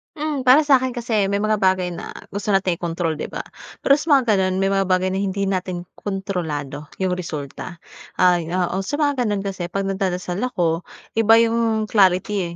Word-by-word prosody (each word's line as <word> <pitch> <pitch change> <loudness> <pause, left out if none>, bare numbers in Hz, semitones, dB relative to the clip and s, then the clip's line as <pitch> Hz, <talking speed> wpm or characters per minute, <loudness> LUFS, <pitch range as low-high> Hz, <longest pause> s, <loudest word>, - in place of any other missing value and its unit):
Hmm, 295 -4 -3
para 285 +5 +7
sa'kin 260 -3 +3
kasi, 225 -4 0
may 200 +1 -1
mga 215 -1 +1
bagay 185 -2 +2
na, 170 - -8 0.2
gusto 200 +2 -5
nating 185 -3 0
i-kontrol 165 -2 -2
'di - - -3
ba? - - -6 0.4
Pero 280 +1 +5
sa 300 -2 +3
mga 245 -5 +2
ganun, 185 0 +1
may 195 - +1
mga 195 -1 +1
bagay 185 0 +1
na 190 - -1
hindi 200 0 -1
natin 185 -2 -2
kontrolado, 160 -8 -4 0.2
yung 185 - +1
resulta. 155 +1 -6 0.4
Ay, 175 -3 +3
oo. 180 +1 -1
Sa 195 +9 -3
mga 285 -6 +1
ganun 205 -1 -1
kasi, 185 -3 -4
'pag 195 +3 -2
nagdadasal 190 -1 -2
ako, 175 -9 -1 0.3
iba 225 0 +6
yung 225 -1 +1
clarity 190 -3 +2
195 Hz, 180 wpm, -21 LUFS, 180-220 Hz, 0.4 s, para